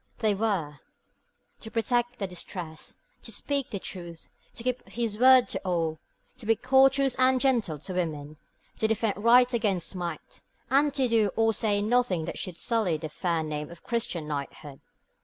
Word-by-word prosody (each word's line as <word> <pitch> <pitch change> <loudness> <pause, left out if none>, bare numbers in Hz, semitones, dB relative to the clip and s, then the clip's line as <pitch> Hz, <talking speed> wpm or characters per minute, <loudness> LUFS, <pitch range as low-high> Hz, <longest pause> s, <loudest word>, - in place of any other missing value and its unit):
They 215 -3 +1
were 190 -9 -1 0.8
to 220 - -7
protect 240 +2 0
the 200 - -2
distressed, 175 -3 -7 0.2
to - - -6
speak 280 -3 -2
the 200 - -3
truth, 175 -3 -8 0.3
to 230 - -7
keep 255 0 -3
his 230 -3 -2
word 255 0 +7
to - - -2
all, 165 -4 -1 0.4
to 225 - -10
be 225 - +4
courteous 270 +2 +4
and 255 0 +4
gentle 240 - +1
to 170 +6 -7
women, 155 -4 -3 0.4
to 220 - +1
defend 220 -2 -1
right 245 +2 +6
against 205 -7 0
might, 170 -4 -6 0.3
and 285 +2 +4
to 265 -2 +2
do 225 -3 +3
or 225 0 +3
say 205 -2 +1
nothing 215 -7 +1
that - - -5
should 180 -2 -5
sully 215 -9 0
the 155 0 -6
fair 165 +1 -1
name 150 -1 -4
of 170 0 -13
Christian 185 -9 -2
knighthood. 145 -1 -6
210 Hz, 170 wpm, -27 LUFS, 170-240 Hz, 0.8 s, word